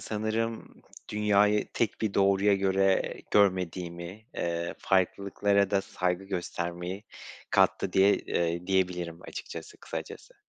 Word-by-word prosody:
sanırım 110 +1 -3 0.3
dünyayı 105 0 +3
tek 115 -4 0
bir 110 -3 -1
doğruya 100 +1 +4
göre 95 0 +2 0.2
görmediğimi, 90 0 0
eee, 85 0 -2
farklılıklara 100 +1 +1
da 100 -1 +3
saygı 90 0 -2
göstermeyi 90 0 -4 0.5
kattı - - +2
diye 95 +1 +5
eee, 85 +1 -2
diyebilirim 90 -3 0
açıkçası, - - -8
kısacası. - - -8
95 Hz, 105 wpm, -29 LUFS, 90-100 Hz, 0.5 s, diye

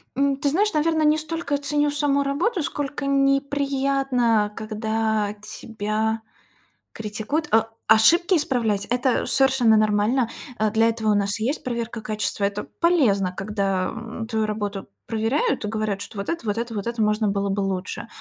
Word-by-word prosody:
М, 275 0 +1
ты 285 0 0
знаешь, 405 +8 +1
наверно, 315 +1 +1
не 305 0 +4
столько 315 -2 -2
ценю 290 +1 +1
саму 285 -1 +2
работу, 335 +9 0
сколько 285 -1 -3
неприятно, 275 -4 +1
когда 220 -1 -1
тебя 220 +1 -3 0.7
критикуют, 220 +9 -3
э. 225 0 +5 0.2
Ошибки 330 - +5
исправлять- 235 - 0
это 250 +1 +1
совершенно 255 -5 +4
нормально, 215 +3 +2 0.3
э, 215 -2 +1
для 225 +1 +3
этого 220 -1 0
у - - +3
нас 200 +1 0
и - - -3
есть 275 +6 -1
проверка 235 -2 -4
качества. 215 -1 -2
Это 200 +1 -2 0.2
полезно, 225 - +2
когда, 195 -2 -1
м, 225 0 -6
твою 220 -2 0
работу 205 -2 -4 0.2
проверяют 225 +3 0
и - - -2
говорят, 215 -2 -2
что 210 - -8
вот 200 - -4
это, 335 -7 -3
вот 205 +1 -1
это, 235 0 -3
вот 205 0 -4
это 235 -1 -2
можно 210 0 +1
было 200 0 0
бы 195 +1 -1
лучше. 190 +2 -3
225 Hz, 160 wpm, -23 LUFS, 210-275 Hz, 0.7 s, э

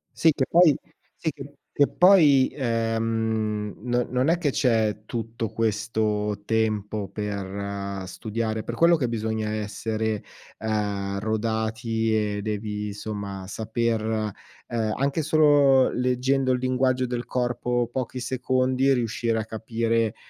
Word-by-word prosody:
Sì, 165 - +5
che 135 - 0
poi 170 -4 +6 0.4
sì 160 - -2
che 140 0 -11 0.2
che 145 - +5
poi, 155 -8 +6
ehm, 115 -3 -1
no 120 0 +1
non 125 +4 +1
è 170 +1 +2
che 155 - +1
c'è 110 -5 +1
tutto 115 -1 -4
questo 105 -1 -1
tempo 110 -2 -1
per 100 -1 -4
studiare, 110 +3 -3
è - - -12
per 120 - -5
quello 170 +7 +5
che 140 -6 0
bisogna 110 -1 -2
essere, 110 0 -2 0.3
ehm, 100 -3 -2
rodati 110 +1 -1 0.2
e - - -3
devi, 105 0 -3
insomma, 100 -2 -5
saper, 110 +1 -1 0.4
ehm, 110 -2 -1
anche 140 +4 0
solo 145 -3 +5
leggendo 130 +1 +1
il 125 - +2
linguaggio 130 0 +1
del 120 -1 -3
corpo 120 -1 -1
pochi 130 0 -3
secondi, 130 +1 +1
riuscire 115 -2 0
a 110 - -2
capire, 115 0 -1
115 Hz, 125 wpm, -25 LUFS, 110-130 Hz, 0.4 s, poi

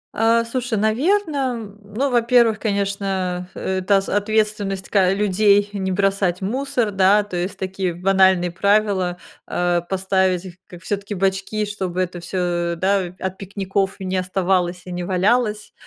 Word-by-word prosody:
А, 230 +1 +3
слушай, 245 -1 -2
наверно, 290 - +1 0.2
м, 210 -3 -9
ну, 230 +7 -2
во-первых, 235 -2 +3
конечно, 195 -3 -2
это 190 +1 +1
с 195 - -6
ответственность, 205 -2 0
ка 190 -3 +3
людей, 205 0 +3
не 190 -1 -2
бросать 195 -2 +1
мусор, 245 +2 -1
да. 195 +2 +4
То 200 -3 -8
есть 185 +3 -3
такие 190 -2 -3
банальные 190 -1 +3
правила, 200 -1 +1 0.3
э, 175 -1 0
поставить 190 -1 +1
их, 180 - -8
как 175 -1 -13
всё-таки 200 +1 -3
бачки, 195 +3 -1
чтобы 190 -3 -4
это 180 -1 -3
всё, 175 -1 -2
да, 190 0 0
от 190 0 -4
пикников 195 0 -2
не 190 0 -3
оставалось 180 -1 0
и 180 - -8
не 175 0 -4
валялось. 210 +4 0
195 Hz, 145 wpm, -21 LUFS, 185-210 Hz, 0.3 s, да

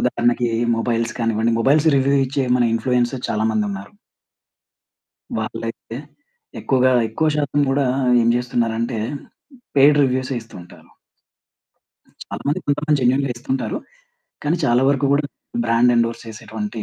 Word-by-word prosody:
ఉదాహరణకి, 120 0 +1 0.3
మొబైల్స్ 115 0 -1
కానివ్వండి. 115 0 +1
Mobiles 145 +6 +3
review 140 +1 +2
ఇచ్చే, 135 +1 -1
మన 125 - +2
ఇన్‌ఫ్లుయెన్సర్ 125 +1 0
చాలా 110 +1 0
మందున్నారు... 100 - -3 1.4
వాళ్ళైతే - - -5 0.6
ఎక్కువగా, 130 -1 +2 0.2
ఎక్కువ 155 +8 0
శాతం 145 -1 0
గూడా 135 0 +1 0.4
ఏం 115 - +2
జేస్తున్నారంటే, 120 -1 -1 0.8
పెయిడ్ 145 +1 +6
రివ్యూసే 130 0 0
ఇస్తుంటారు. 90 -6 -14 1.3
చాలా - - -7
మంది, 145 - 0
కొంతమంది 150 +1 +1
జెన్యూన్‌గా 130 +2 +2
ఇస్తుంటారు. 130 +2 -3 0.7
కానీ 155 +4 +1
చాలా 120 -1 +3
వరకు 140 0 +2
గూడా 145 +1 +2 0.4
బ్రాండ్ 115 +1 +3
ఎండోర్స్ 115 0 0
చేసేటువంటి 110 0 -6
125 Hz, 115 wpm, -20 LUFS, 115-140 Hz, 1.4 s, పెయిడ్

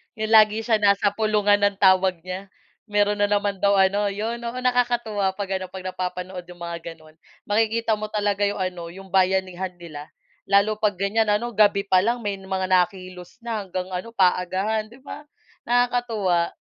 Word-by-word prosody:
'yong 220 0 -3
lagi 215 0 +5
siya 225 -2 +2
nasa 200 0 +3
pulungan 210 -2 +2
ng 200 0 +2
tawag 190 -2 +4
niya 185 +2 -6 0.4
meron 205 0 +2
na 205 - +3
naman 205 -1 0
daw 200 0 +4
ano 200 +2 +2
'yon 225 +4 -4
oo 235 +2 -4
nakakatuwa 240 -5 0
'pag 195 -2 -3
ano, 185 - -5
'pag 190 -1 -8
napapanood 180 0 -5
'yong 180 -1 -13
mga 170 0 -4 0.2
gano'n 155 -1 -20 0.3
makikita 225 +1 +1
mo 215 0 -5
talaga 205 -1 0
'yong 200 - -3
ano 180 -2 -4
'yong 195 +1 -12
bayanihan 190 -1 +1
nila 155 -4 -10 0.4
lalo 200 +2 +3
'pag 210 -3 +1
ganyan 210 +2 +1
ano, 235 +3 -1
gabi 205 -1 +4
pa 185 -1 +4
lang 235 +3 0
may 205 -1 -2
mga 190 -1 -3
nakilos 185 -1 -1
na 230 -3 -4
hanggang 185 -1 -5
ano 185 +6 -5
paagahan, 195 +2 0
'di 240 +4 -16
ba, 290 +2 -9 0.4
nakakatuwa. 235 -8 +1
200 Hz, 175 wpm, -23 LUFS, 185-215 Hz, 0.4 s, lagi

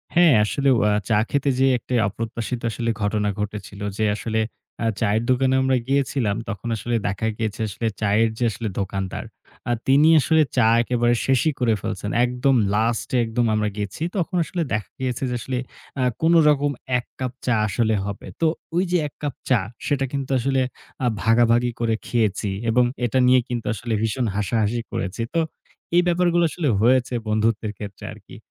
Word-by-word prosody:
হ্যাঁ, 170 -3 +6
আসলে 140 +6 +1
ও - - +2
আ - - +2 0.2
চা 105 - +4
খেতে 140 0 +1
যে 135 - +5
একটা 125 - -7
অপ্রত্যাশিত 115 +3 -4 0.4
ঘটনা 105 0 0
ঘটেছিল। 105 -1 -5 0.2
যে 110 - 0
আসলে 110 +1 -2 0.4
আ - - 0 0.2
চায়ের 110 +1 +2
দোকানে 130 +1 +3
আমরা 130 -1 +2
গিয়েছিলাম, 135 -6 +1
তখন 100 +4 -5
আসলে 120 +2 -2
দেখা 100 +3 -2
গিয়েছে 110 -1 -3
আসলে 115 +3 -3
চায়ের 110 +2 +3
যে 125 - -1
আসলে 110 +2 -4
দোকানদার। 95 -1 -3 0.5
আ - - +2 0.2
তিনি 140 +4 +5
আসলে 160 +3 +3 0.2
চা 110 -2 +5 0.2
একেবারে 120 0 +1
শেষই 135 +4 +3
করে 115 -3 +2
ফেলছেন। 105 -1 -4 0.2
একদম 125 +2 +1 0.2
লাস্টে 115 +3 0
একদম 115 +1 0
আমরা 105 0 +1
গেছি, 105 +8 -4
তখন 180 +1 -1
আসলে 175 +2 -3
দেখা 105 -4 -2
গিয়েছে 130 0 -2 0.2
আসলে 125 +2 -3 0.4
আ - - +2 0.2
কোনরকম 150 -3 +4 0.3
এক 125 - -5
কাপ 130 -2 -2
চা 125 - +2
আসলে 110 +2 +1
হবে। 100 -1 -6 0.2
তো 165 - +3 0.3
ওই 180 - +3
যে 180 - +4
এক - - -14
কাপ 145 -3 -2
চা 125 -4 +4 0.3
সেটা 135 -2 +1
কিন্তু 140 -1 -3
আসলে 135 +2 +1 0.4
আ - - +2 0.2
ভাগাভাগি 120 +1 +3
করে 115 -1 +1
খেয়েছি। 105 -4 0 0.2
এবং 125 +2 +4 0.2
এটা 120 +2 0
নিয়ে 130 0 +6
কিন্তু 120 -2 -3
আসলে 115 +2 -4
ভীষণ 115 +3 0
হাসাহাসি 110 +2 0
করেছি। 95 +4 -3
তো 165 - +2 0.6
এ - - +8
ব্যাপারগুলো 175 0 +2
আসলে 160 -1 -2
হয়েছে 125 +2 +3
বন্ধুত্বের 110 0 0
ক্ষেত্রে 100 -1 -8
আরকি। - - -14
120 Hz, 170 wpm, -23 LUFS, 110-135 Hz, 0.6 s, এ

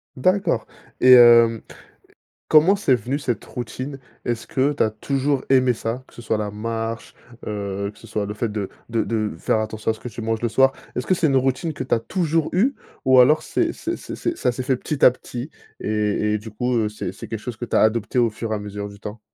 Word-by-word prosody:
D'accord, 185 +9 +1 0.3
et 130 0 +8
hem, 115 -2 +7 0.9
comment 160 +6 +6
c'est 195 -10 +2
venu, 125 +4 -1
cette 125 -5 -3
routine? 130 +4 -6 0.3
Est-ce 120 -2 -2
que 140 +2 +1
tu - - +1
as 110 - +2
toujours 135 +5 -1
aimé 130 -2 +4
ça, 115 +3 -4
que - - -23
ce 120 - -10
soit 110 -1 -1
la 105 -1 -3
marche, 115 +1 -4 0.3
heu, 100 -1 -3
que - - -23
ce - - -13
soit 105 -1 -2
le 105 - -5
fait 115 +1 -2
de 105 -3 -3 0.2
de 115 -1 +1
de 110 -4 -1
faire 110 - +1
attention 110 0 -2
à - - -2
ce 110 - -15
que 125 - -6
tu 115 - -10
manges 115 0 -2
le 120 - 0
soir? 135 +3 +4 0.2
Est-ce 125 - -3
que 185 - +3
c'est 170 -3 +2
une 135 -1 +3
routine 135 +5 0
que 130 -3 -5
tu - - +2
as 115 - -2
toujours 165 -2 0
eue, 240 +10 +2 0.3
ou 130 -1 +7
alors 150 +5 +5
c'est 335 -1 0
c'est 340 +1 -4
c'est - - -8
c'est 345 -1 -2
ça 125 - +1
s'est 125 +1 -5
fait 130 0 +1
petit 145 +3 0
à 125 - +9
petit 125 +3 -7 0.3
et 105 0 0
et - - +2
du 110 +1 -10
coup, 125 +3 -1
heu, 110 -2 +1
c'est 100 -3 -5
c'est - - -10
quelque 110 - -4
chose 120 0 -6
que 120 - -8
tu - - 0
as - - +4
adopté 110 +2 +2
au 120 -2 +3
fur 110 +1 -6
et - - +1
à - - -3
mesure 105 0 -6
du 100 0 -13
temps? 105 +1 -7
120 Hz, 250 wpm, -22 LUFS, 110-135 Hz, 0.9 s, à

